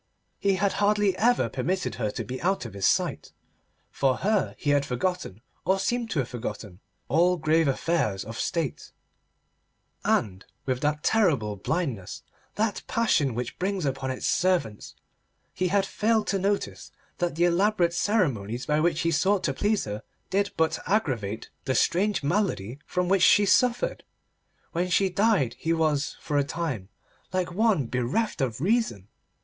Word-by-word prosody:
He 200 -1 +2
had 200 +1 +1
hardly 205 -2 +3
ever 225 - +3
permitted 165 - -2
her 105 - +1
to - - -4
be 130 +1 -6
out 190 -4 0
of 115 - -8
his 100 -1 +1
sight; - - 0 0.6
for 130 -2 +1
her, 210 0 0
he 145 - 0
had 145 -1 +3
forgotten, 130 - -3 0.2
or 190 - +2
seemed 235 +4 -1
to - - -3
have 130 -4 +1
forgotten, 110 -6 -6 0.3
all 175 +4 +3
grave 160 0 +2
affairs 135 - 0
of 115 +2 -7
State; 165 -6 -3 1.1
and, 95 -2 0 0.2
with 130 -1 -1
that 150 0 0
terrible 145 - +2
blindness 115 - -3 0.3
that 215 -1 0
passion 150 - +1 0.2
brings 190 -2 -1
upon 135 -1 -2
its 130 - -4
servants, 170 - 0 0.6
he 185 - 0
had 195 +2 +2
failed 215 +2 +1
to 195 - 0
notice 200 +2 -2 0.3
that 175 -3 -1
the 170 +2 +3
elaborate 175 0 +2
ceremonies 130 - 0
by 150 0 +1
which 165 0 +1
he 165 - +1
sought 190 +5 +2
to 135 - 0
please 210 +8 +1
her 105 0 -5 0.3
did 200 +1 +1
but 160 0 +1
aggravate 120 - -1
the 130 -1 0
strange 200 0 +2
malady 145 - -1
from 180 -1 -1
which 195 0 +3
she 205 +3 +6
suffered. 245 +4 +2 0.7
When 180 +1 -1
she 190 +1 +2
died 190 - +2
he 165 +1 0
was, 155 -3 0
for 145 -1 -1
a - - +3
time, 140 - -4 0.4
like 185 -1 -1
one 205 - +2
bereft 125 - -1
of 125 -4 -1
reason. 185 - 0
165 Hz, 155 wpm, -26 LUFS, 130-195 Hz, 1.1 s, she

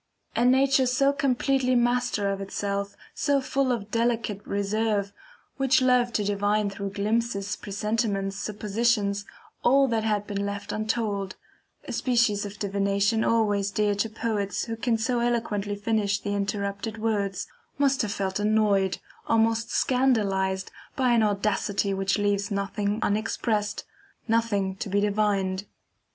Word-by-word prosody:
A 235 - +2
nature 265 +1 +4
so 275 +3 +3
completely 270 -1 +1
master 240 -3 +1
of 195 0 -3
itself, 200 0 -3 0.2
so 285 -2 +1
full 270 0 0
of 215 -4 -3
delicate 230 -3 0
reserve, 200 0 0 0.4
which 265 -1 +3
loved 250 -2 +2
to 210 - +1
divine 205 +1 +1
through 200 0 -5
glimpses, 210 0 -1
presentiments, 205 -1 -2
suppositions, 205 0 0 0.4
all 275 +2 +5
that 225 -2 0
had 210 -2 0
been 200 -1 -3
left 200 0 -4
untold 215 -3 -2 0.5
(a - - -4
species 230 -5 +1
of 200 +1 -10
divination 200 +2 +1
always 205 -3 +2
dear 205 0 +1
to 205 +3 -1
poets 215 -2 -2
who 230 - -4
can 230 0 0
so 240 +2 0
eloquently 220 -4 -1
finish 205 -1 0
the 205 - -3
interrupted 200 +2 -2
words) 200 -3 -1 0.3
must 275 -1 +2
have 215 -3 -2
felt 195 -1 -2
annoyed, 205 -3 +2 0.3
almost 225 0 +2
scandalized, 200 -7 +1 0.2
by 255 -2 +2
an 235 -1 +4
audacity 205 -1 0
which 195 0 0
leaves 205 -1 0
nothing 200 +1 -1
unexpressed, 210 0 -1 0.4
nothing 215 -4 +1
to 200 - -4
be 200 +1 +2
divined. 200 -2 0
210 Hz, 135 wpm, -26 LUFS, 200-230 Hz, 0.5 s, all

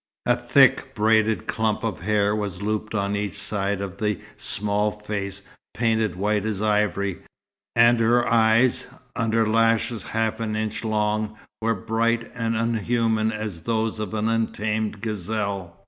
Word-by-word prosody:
A - - +4
thick, - - +3
braided 110 0 +2
clump 110 -1 -1
of 115 - -2
hair 105 -1 +1
was 100 -4 -3
looped 110 +1 -2
on 100 -1 0
each 100 -1 -3
side 100 0 -2
of 100 -1 -5
the 105 -1 -1 0.2
small 105 0 0
face 100 -2 -5 0.3
painted 110 -4 +1
white 105 +2 0
as 105 -3 -2
ivory, 105 -3 0 0.6
and 120 0 +5
her 120 +1 +3
eyes, 115 +2 +3 0.3
under 115 -1 +1
lashes 115 +1 +2
half 110 0 -2
an 110 -1 -2
inch 110 +1 -3
long, 110 0 -1 0.2
were 115 +1 +1
bright 115 +1 0
and 115 -2 -1
unhuman 115 -1 +1
as 105 -5 -5
those 110 +3 -1
of 110 0 -4
an 110 +1 0
untamed 110 -2 -1
gazelle. 100 -4 -3
110 Hz, 145 wpm, -24 LUFS, 105-115 Hz, 0.6 s, and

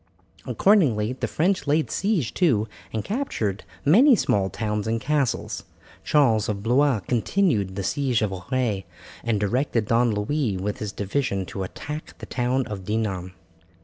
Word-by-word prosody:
Accordingly 130 - +3
the 130 - -3
French 180 -1 0
laid 150 +2 +1
siege 195 - 0
to 120 - +2 0.2
and 110 -2 -3
captured 155 - -2 0.2
many 245 - +7
small 100 - +1
towns 105 +1 -2
and 115 +1 0
castles. 140 0 -1 0.4
Charles 130 -9 +3
of 100 -1 -3
Blois 125 0 +3
continued 115 - +1
the 100 - -3
siege 130 -1 0
of 105 - 0
Auray, 110 0 -2 0.4
and 115 -3 0
directed 115 +2 0
Don 115 +3 +3
Louis 105 +1 -1
with 100 +5 -3
his 105 -4 -4
division 100 -1 -1
to 100 +1 -6
attack 150 - -6
the - - -8
town 125 +1 0
of 100 -3 -6
Dinan. 95 -3 -2
115 Hz, 145 wpm, -24 LUFS, 105-145 Hz, 0.4 s, many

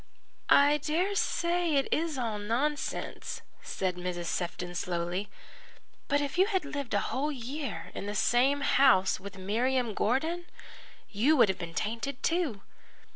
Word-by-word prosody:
"I 290 +1 +6
dare 335 +7 0
say 345 -4 +1
it 275 - +2
is 320 -2 -1
all 225 -4 -2
nonsense," 255 +8 -2 0.2
said 185 -2 -2
Mrs. 175 -1 -4
Sefton 175 +1 -3
slowly, 175 +3 -2 0.8
"but 285 +1 +2
if 285 +5 -3
you 380 - +6
had 380 -7 0
lived 280 -6 -3
a - - +4
whole 290 +4 0
year 275 +2 -5
in 200 - -5
the 205 - -3
same 265 +6 +3
house 260 -11 +4
with 200 +1 -9
Miriam 235 +5 0
Gordon, 315 - 0 0.7
you 260 +10 +3
would 230 -5 +6
have 190 - -1
been 170 -2 -6
tainted 235 +5 -3
too. 325 - 0
255 Hz, 145 wpm, -30 LUFS, 200-295 Hz, 0.8 s, I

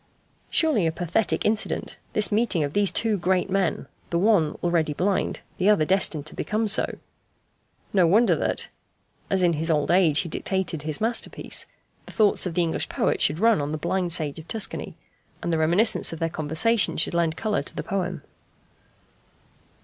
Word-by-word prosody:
Surely 255 - +2
a - - 0
pathetic 175 +6 -1
incident, 215 +1 -1
this 210 - +3
meeting 210 -6 +1
of 145 0 -4
these 205 -1 +2
two 220 -3 0
great 185 +2 0
men 195 -2 0 0.2
the 170 - 0
one 180 -5 +2
already 170 -3 +1
blind, 190 +5 -1 0.2
the 190 +2 +3
other 205 -7 +3
destined 170 -5 +1
to 155 - -8
become 215 +1 -2
so. 205 - +1 1.0
No 185 -4 +4
wonder 220 +7 +4
that, - - -1 0.6
as 190 -1 +2
in 175 -1 +3
his 160 +2 -2
old 150 -1 +1
age 170 -5 +4
he 175 - -5
dictated 175 -1 -3
his 150 +2 -2
masterpiece, 230 +1 -1 0.4
the - - -10
thoughts 210 -4 +3
of 170 - -6
the 175 - +2
English 165 -1 -2
poet - - -1
should 150 - +2
run 225 -3 +3
on 145 +1 -3
the 155 - -2
blind 180 +3 -1
sage 155 -3 +1
of 160 - -12
Tuscany, 220 -3 -3 0.5
and 170 - -1
the 160 - +1
reminiscence 180 +8 +3
of 165 - -6
their 165 +1 -1
conversation 160 +8 +1
should 165 - +1
lend 170 -1 0
colour 215 -2 -1
to - - -9
the - - -4
poem. 180 -5 -3
180 Hz, 180 wpm, -24 LUFS, 160-205 Hz, 1.0 s, No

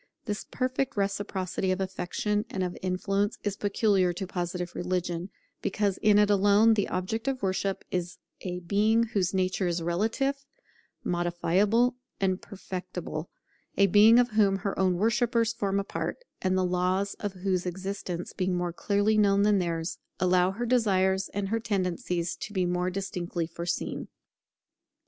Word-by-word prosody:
This 210 -2 -3
perfect 255 -1 -1
reciprocity 195 -2 -1
of 185 - -1
affection 195 +2 -1
and 190 - -2
of 180 -1 -3
influence 195 +2 0
is 205 -1 -1
peculiar 200 -3 +2
to 185 +3 -4
Positive 175 -1 -4
religion, 180 0 -2 0.3
because 200 -1 0
in 210 -1 +5
it 210 0 +5
alone 205 +3 +5
the 205 -2 +1
object 215 +7 -3
of 265 -4 -1
worship 195 0 -1
is 180 -1 -2 0.2
a 180 -1 -4
Being 210 +6 +3
whose 200 -6 0
nature 185 0 0
is 170 -1 -1
relative, 225 +11 0 0.6
modifiable, 185 +8 +2 0.2
and 190 -1 +1
perfectible; 180 -4 -6 0.5
a 200 - +6
Being 210 +4 +7
of 245 0 +4
whom 205 -2 +4
her 195 +1 -2
own 185 -1 +3
worshippers 230 +3 +2
form 200 -2 0
a - - -1
part, - - -3 0.2
and 185 0 +1
the 185 - +2
laws 185 +2 0
of 205 -2 -3
whose 185 -1 -1
existence, 185 -1 -4
being 185 -1 0
more 175 -1 -1
clearly 205 +4 +2
known 200 -1 +4
than 205 -1 +4
theirs, 170 -1 -2 0.2
allow 180 0 +3
her 225 +5 -3
desires 195 -6 +2
and 200 -1 -3
her 225 +2 +1
tendencies 180 -4 -1
to 210 - -7
be 185 -3 +1
more 180 +1 0
distinctly 180 -3 -3
foreseen. 170 +1 -3
190 Hz, 155 wpm, -28 LUFS, 180-205 Hz, 0.6 s, Being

